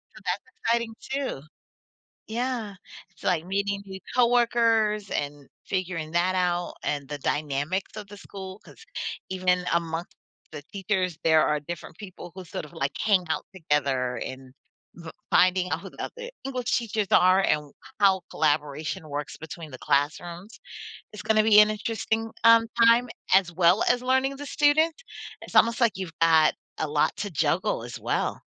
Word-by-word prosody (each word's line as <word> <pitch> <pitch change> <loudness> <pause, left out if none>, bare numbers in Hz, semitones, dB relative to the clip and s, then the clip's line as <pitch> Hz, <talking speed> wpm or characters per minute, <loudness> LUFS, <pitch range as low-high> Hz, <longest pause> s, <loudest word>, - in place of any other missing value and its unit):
So, - - -13
that's - - -1 0.2
exciting 230 0 +1
too. 270 - -3 0.9
Yeah. 235 -2 -3 0.4
It's 195 - -19
like 170 -3 +1
meeting 200 +1 -1
new 190 -1 -7 0.2
coworkers 230 -4 +3
and 145 -1 -3 0.2
figuring 180 -5 -3
that 175 +2 +2
out, 175 -1 0
and 145 -2 -2
the 145 - -5
dynamics 150 +8 -2
of 210 -1 -7
the 205 - -11
school 195 0 -9
'cause 450 - -15 0.4
even 185 -1 -5
in 180 0 +3
among 170 0 -1 0.5
the 150 -2 -7
teachers, 190 -3 -1
there 160 -1 +4
are 150 0 +1
different 165 +1 -8
people 185 -4 -10
who 185 -1 -8
sort 165 - -6
of 150 - -14
like 135 +1 -3
hang 200 -4 +3
out 160 - -2
together 140 -7 0
and 130 0 -7 0.4
v 170 -1 -11 0.2
finding 185 0 +3
out - - 0
who - - -9
the - - -13
other 485 0 -6 0.2
English 255 -2 -3
teachers 220 -3 -1
are 185 +1 +6
and 150 -4 0 0.3
how 195 -2 +5
collaboration 150 +1 -1
works 145 0 -5
between 160 0 -9
the 130 - -9
classrooms. 170 - -1 0.5
It's 210 - -8
gonna 215 0 +3
be 215 -1 +7
an 210 0 +7
interesting, 225 +1 -2
um, 230 0 +7 0.2
time 235 +2 +5 0.2
as 185 -2 +4
well 175 +4 +4
as 245 0 +2
learning 260 +2 +1
the 290 - -7
student. 305 +3 +3 0.5
It's - - -11
almost 230 +2 +4
like 230 -5 +3
you've 180 -4 -6
got 160 -1 +5 0.2
a - - -1
lot 150 0 +1
to 205 - -3
juggle 150 - 0
as - - -7
well, - - -1
185 Hz, 165 wpm, -26 LUFS, 160-220 Hz, 0.9 s, be